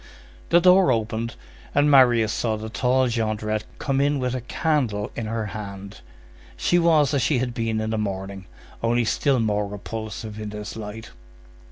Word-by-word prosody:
The 170 - +6
door 180 -3 +6
opened, 115 0 -2 0.4
and 145 +1 +4
Marius 120 -5 +5
saw 110 -2 0
the 110 +1 -6
tall 130 +3 +2
Jondrette 110 -2 -1
come 135 -1 0
in 145 +1 +2
with 125 -2 -1
a 130 - -3
candle 120 -6 -1
in 115 - -4
her 110 0 -2
hand. 100 -1 -8 0.6
She 175 - +2
was 155 -4 +3
as 140 - +2
she 140 +3 +2
had 125 0 -1
been 115 -2 -1
in 110 0 -2
the 110 - -1
morning, 95 -2 -4 0.3
only 120 +1 +1
still 135 +3 +1
more 105 -2 0
repulsive 110 +1 -6
in 105 -1 -5
this 105 0 -7
light. 110 +1 -8
115 Hz, 170 wpm, -24 LUFS, 105-130 Hz, 0.6 s, The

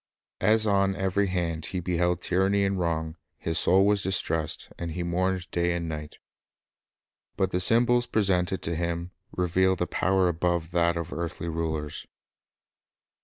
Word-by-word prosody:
As 110 +1 +3
on 100 -2 +2
every 95 +2 0
hand 85 -4 -2
he 95 - -3
beheld 90 0 0
tyranny 95 +2 +2
and 95 -1 -1
wrong, 80 -1 -2 0.2
his 80 -1 -2
soul 95 +2 +4
was 100 -1 +3
distressed, 80 -4 -1
and 85 -2 -4
he 90 - -3
mourned 95 +1 -1
day 85 0 +1
and 85 -1 -3
night. 75 -1 -6 1.2
But 95 0 +1
the 90 - 0
symbols 120 +5 +4
presented 95 -3 +1
to 85 - -1
him 85 +1 -3 0.2
revealed 90 +1 +1
a 90 - +1
power 95 +1 +1
above 85 -1 -1
that 85 0 +2
of 85 +1 -4
earthly 85 0 -4
rulers. 80 -2 -3
90 Hz, 150 wpm, -27 LUFS, 85-95 Hz, 1.2 s, soul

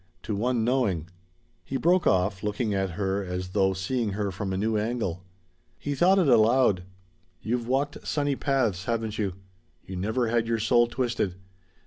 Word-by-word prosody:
To 105 - -2
one 120 +2 0
knowing 105 -10 0 0.3
" 90 -1 -39
He 135 - -3
broke 175 +5 +3
off, 95 +1 +2
looking 105 +1 -1
at 95 -2 -1
her 100 0 0
as 90 0 -4
though 95 0 +2
seeing 105 +3 -2
her 100 -1 -2
from 95 +1 -4
a 95 - -1
new 110 +3 0
angle. 105 -5 -2 0.5
He 145 - -3
thought 180 +7 +4
it 180 -5 +3
aloud. 115 -4 +4 0.6
"You've 115 +2 -1
walked 140 +3 -1
sunny 145 -2 0
paths, 120 -11 0
haven't 115 -2 -2
you? 100 -4 -1 0.5
You 95 - -7
never 110 +5 0
had 115 0 +1
your 115 0 +1
soul 120 +2 +3
twisted. 120 -7 -1
110 Hz, 170 wpm, -27 LUFS, 95-125 Hz, 0.6 s, thought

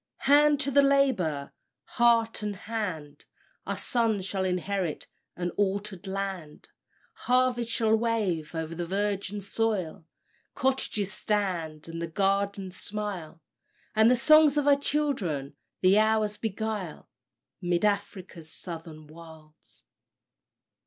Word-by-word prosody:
"Hand 290 +1 +5
to 280 - 0
the 280 +1 +6
labour! 255 - +1 0.3
heart 230 -2 +2
and 210 -1 -3
hand! 180 -9 -5 0.4
Our - - -2
sons 225 -6 0
shall 190 0 -2
inherit 185 -2 -2 0.3
an 175 0 -3
altered 200 -1 -2
land: 190 -5 -5 0.6
Harvests 250 -2 +2
shall 220 -1 +3
wave 210 -9 -1
o'er 160 0 -1
the 165 +2 -5
virgin 200 +1 -2
soil, 195 -6 -2 0.5
Cottages 220 -7 -1
stand, 175 -8 -2
and 165 0 -5
gardens 195 -1 0
smile, 200 -7 -6 0.5
And 220 +1 +6
the 250 - +5
songs 305 +3 +5
of 290 -1 +1
our 285 - +7
children 220 - -1 0.3
the 190 +3 +5
hours 215 -1 +2
beguile, 215 -5 -4 0.5
'Mid 175 +2 +1
Afric's 195 -5 -3
Southern 160 -3 -7
Wilds. 160 -1 -15
200 Hz, 110 wpm, -28 LUFS, 170-225 Hz, 0.6 s, our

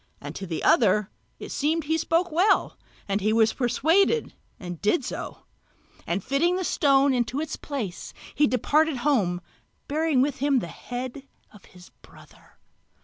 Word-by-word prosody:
And 145 +1 -8
to 190 +3 -7
the 165 -2 -4
other 210 -2 +3 0.3
it - - -9
seemed 315 +3 0
that - - -14
he 320 - +2
spoke 335 +2 0
well, 375 +5 +2 0.3
and 200 +1 -1
he 215 +2 +1
was 220 0 +3
persuaded 330 - +2 0.3
and 175 -3 -7
did 240 +6 +1
so; - - -6 0.6
and 175 +2 -1
fitting 330 +7 +1
the 370 - -2
stone 275 -4 +3
into 245 +2 -1
its 310 0 -3
place 230 -11 -6 0.2
he 295 - +3
departed 295 +5 +1
home 190 -12 +1 0.5
bearing 310 -2 +1
with 285 -1 -2
him 280 0 +2
the 230 - -1
head 255 - -7 0.3
of 210 - -17
his 180 -1 -17
brother. - - -19
270 Hz, 160 wpm, -25 LUFS, 210-310 Hz, 0.6 s, other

